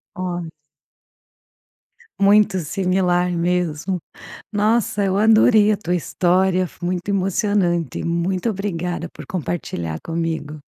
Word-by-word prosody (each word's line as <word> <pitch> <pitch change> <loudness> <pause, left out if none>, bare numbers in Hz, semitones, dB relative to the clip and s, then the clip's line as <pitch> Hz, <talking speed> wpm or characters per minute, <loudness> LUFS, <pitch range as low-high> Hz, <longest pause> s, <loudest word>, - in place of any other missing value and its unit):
Olha. 175 -2 -4 1.7
Muito 200 0 +4
similar 180 +1 +1
mesmo. 175 0 -1 0.5
Nossa! 210 0 +1
Eu 190 -1 +1
adorei 215 0 +5
a - - +1
tua 180 -3 -2
história, 185 +2 +1
foi 175 - -12
muito 180 +1 -3
emocionante. 190 - 0
Muito 175 +5 0
obrigada 180 -4 -3
por - - -11
compartilhar 110 - -4
comigo. 160 -2 -3
180 Hz, 100 wpm, -21 LUFS, 170-200 Hz, 1.7 s, adorei